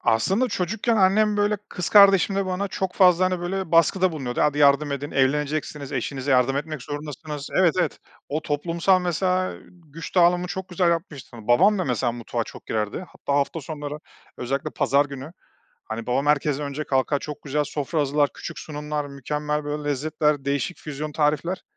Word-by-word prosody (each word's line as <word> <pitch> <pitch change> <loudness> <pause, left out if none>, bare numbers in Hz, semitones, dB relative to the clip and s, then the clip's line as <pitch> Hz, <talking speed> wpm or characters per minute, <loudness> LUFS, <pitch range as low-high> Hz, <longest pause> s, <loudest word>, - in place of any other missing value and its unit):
Aslında 195 - +2
çocukken 215 +5 -1
annem, 210 +2 +3
böyle, 205 0 +2
kız 180 - -4
kardeşimle 195 -1 +5
bana 190 +2 -2
çok 190 -1 -3
fazla, 185 -1 +5
hani, 185 -1 0
böyle, 185 -1 -3
baskıda 180 +2 +4
bulunuyordu: 130 -5 -3
"Hadi 150 0 +2
yardım 145 0 +4
edin, 140 +1 -4
evleneceksiniz, 145 +1 -1
eşinize 135 +2 -3
yardım 130 +1 +3
etmek 150 -2 -4
zorundasınız." 145 0 -6
Evet, 175 -4 +4
evet. - - -1 0.3
O 155 +2 -2
toplumsal 170 +5 +1
mesela, 185 +1 0
eee, - - -13
güç 165 -2 -11
dağılımı 175 0 +4
çok 190 +1 -5
güzel 180 -1 +2
yapmıştı. 155 -8 -4
Babam 185 - +4
da 185 - 0
mesela 125 -1 0
mutfağa 120 0 -3
çok - - -12
girerdi, 110 - -2
hatta 140 - -5
hafta 145 +3 -1
sonları, 145 0 -6 0.4
özellikle 135 +3 -3
pazar 140 +1 +2
günü, 140 +3 -8 0.5
hani, 110 +1 -6
babam 135 +3 0
herkesten 150 0 +1
önce 140 +2 -4
kalkar, 135 +2 +1
çok 150 0 -8
güzel 145 +1 -1
sofra 150 +2 -2
hazırlar, 145 0 +2
küçük 170 - -7
sunumlar 150 -1 -4
mükemmel, 150 +2 -3
böyle, 145 0 -4
lezzetler, 150 0 0
değişik 140 +5 -2
füzyon 150 0 -6
tarifler. 155 +5 0
150 Hz, 170 wpm, -24 LUFS, 140-180 Hz, 0.5 s, kardeşimle